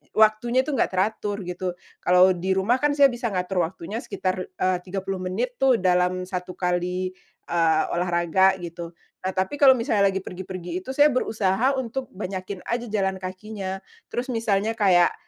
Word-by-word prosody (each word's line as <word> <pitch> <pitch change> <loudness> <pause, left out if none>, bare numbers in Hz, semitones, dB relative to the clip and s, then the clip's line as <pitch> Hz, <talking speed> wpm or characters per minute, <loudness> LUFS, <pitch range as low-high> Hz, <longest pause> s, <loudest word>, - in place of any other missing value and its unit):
waktunya 220 +3 +3
itu 300 - -4
nggak - - +1
teratur, 205 +2 -1
begitu. 180 +1 -3 0.3
Kalau 180 +1 +6
di 185 +2 -2
rumah 215 +7 +2
kan 295 - +4
saya 280 -1 +7
bisa 240 0 -3
ngatur 180 -1 0
waktunya 190 +5 -6
sekitar, 185 -6 -2
eee, 185 0 0
30 190 0 -3
menit 220 +8 -2
tuh, 265 -2 +5
dalam 180 0 +2
1 180 0 -5
kali, 180 +1 -1 0.4
eee, 165 -2 +3
olahraga 175 +2 +2
gitu. 170 0 -7 0.3
Nah, 190 - -1
tapi 190 +10 -1
kalau 265 -2 +8
misalnya 210 -4 +2
lagi 195 0 0
pergi-pergi 180 -1 -6
itu, 255 +8 -7
saya 290 +1 +7
berusaha 225 +1 +1
untuk 260 0 -3
banyakin 185 -1 -5
aja 240 0 -3
jalan 190 -2 0
kakinya. 190 +1 -5 0.3
Terus 245 +2 -2
misalnya 220 -1 0
kayak, 185 -5 +4
190 Hz, 160 wpm, -24 LUFS, 180-220 Hz, 0.4 s, kalau